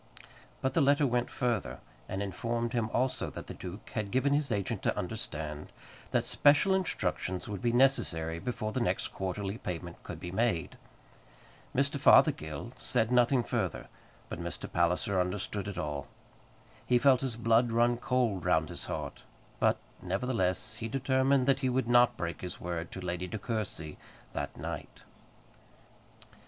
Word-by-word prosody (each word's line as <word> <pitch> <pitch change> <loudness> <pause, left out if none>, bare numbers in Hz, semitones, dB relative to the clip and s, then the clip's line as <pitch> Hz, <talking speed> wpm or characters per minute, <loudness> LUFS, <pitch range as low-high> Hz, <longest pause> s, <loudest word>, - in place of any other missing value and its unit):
But 130 0 +1
the 165 - +3
letter 145 +1 +4
went 125 -1 +1
further, 105 - -1 0.3
and 95 +2 -2
informed 115 +5 -2
him 115 -2 0
also 130 +1 0
that - - -8
the - - -7
duke 95 +3 -8
had 105 -3 -2
given 130 +5 +2
his 145 -2 +1
agent 100 -3 -1
to - - 0
understand 75 -1 -4 0.4
that - - +1
special 150 +7 +5
instructions 165 - -1
would 100 -3 -5
be 120 - +2
necessary 85 -11 +2
before 110 0 -3
the - - -1
next - - +1
quarterly 95 +3 -3
payment 85 -1 -5
could 80 - -7
be 90 0 -6
made. 95 -6 0 1.0
Mr. - - +1
Fothergill 75 -2 +4
said 115 +1 +1
nothing 125 0 +4
further, - - -2 0.4
but - - -6
Mr. - - -5
Palliser 90 +3 +1
understood 100 +2 -3
it 100 -3 -5
all. 75 -5 -3 0.8
He 125 - +5
felt 130 0 +5
his 130 -4 -1
blood 115 +1 +3
run 120 +1 +3
cold 120 -6 0
round 80 -3 +2
his - - -5
heart; - - -5 0.4
but, - - +3 0.2
nevertheless, 95 0 -1
he 115 - -4
determined 130 +1 +2
that 135 0 +3
he 130 -2 +1
would 125 -1 0
not 120 0 +5
break 85 -1 -4
his 90 -1 -5
word 85 -1 -4
to 95 - -6
Lady 90 0 -3
De 110 - -4
Courcy 105 -9 -4 0.3
that - - -4
night. - - -6
110 Hz, 155 wpm, -31 LUFS, 90-125 Hz, 1.0 s, special